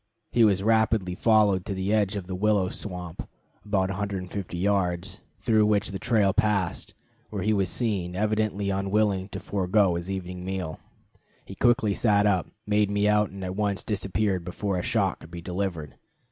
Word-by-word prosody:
He 120 - +4
was 100 -3 +3
rapidly 110 -4 +2
followed 105 -2 +3
to 100 - -2
the 95 +2 -1
edge 105 -2 +2
of 100 -3 -4
the 95 - -6
willow 100 -1 +2
swamp 90 -5 -6 0.3
(about 95 -2 0
150 95 -2 -4
yards), 95 0 0 0.2
through 110 -2 +3
which 105 -1 +1
the 95 - -5
trail 100 -2 +2
passed, 100 -4 0 0.3
where - - -4
he 110 - +2
was 95 -3 +1
seen, 95 -7 -1
evidently 105 -1 0
unwilling 100 0 0
to 95 - -6
forego 95 0 +1
his 85 +2 -4
evening 90 -1 -5
meal. 90 -4 -4 0.7
He - - -9
quickly 120 -4 +2
sat 105 -1 +3
up, 95 -4 +2 0.2
made 105 -1 +2
me 100 0 +1
out, 105 -1 +3
and 95 0 -8
at 90 0 -4
once 100 -1 -1
disappeared 100 -2 -1
before 90 +2 -2
a - - -1
shot 100 -1 0
could 80 - -13
be 85 0 -7
delivered. 85 -4 -4
100 Hz, 175 wpm, -26 LUFS, 90-105 Hz, 0.7 s, He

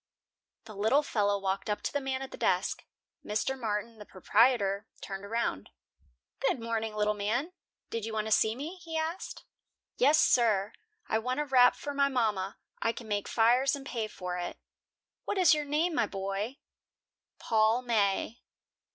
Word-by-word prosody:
The 215 - -10
little 220 +9 +3
fellow 205 -6 +1
walked 195 +2 -2
up 210 - -2
to - - -2
the 285 - 0
man 265 0 -2
at 265 - -8
the - - -7
desk. - - 0 0.4
Mr. 215 +5 -1
Martin, 225 -2 -3
the 210 - -9
proprietor, 205 0 +2
turned 195 0 -6
around. 200 - -2 0.7
"Good 270 -2 +1
morning, 225 -1 -2
little 210 0 +2
man. 230 - -1 0.4
Did 230 -1 -3
you 225 - -4
want 215 -1 -1
to 220 - -4
see 220 +1 +3
me?" 310 +8 -6
he 330 -2 -5
asked. 320 +3 -4 0.5
"Yes, 290 +4 +5
sir. 215 -4 +3 0.3
I 220 - +1
want 255 +4 -2
a 295 - 0
wrap 255 -3 +5
for 290 - -5
my 280 0 +3
mama. 215 -7 0 0.2
I 230 - +1
can 230 - -9
make 205 -1 -1
fires 245 +5 +3
and 275 -1 -9
pay 230 -4 -3
for 180 -3 -5
it." 175 - -5 0.7
"What 410 - -2
is 360 -3 +6
your 300 -1 0
name, 310 +4 +1
my 230 - +1
boy?" 195 +6 -4 0.8
"Paul 220 +2 +2
May." 220 -1 0
225 Hz, 170 wpm, -30 LUFS, 210-270 Hz, 0.8 s, is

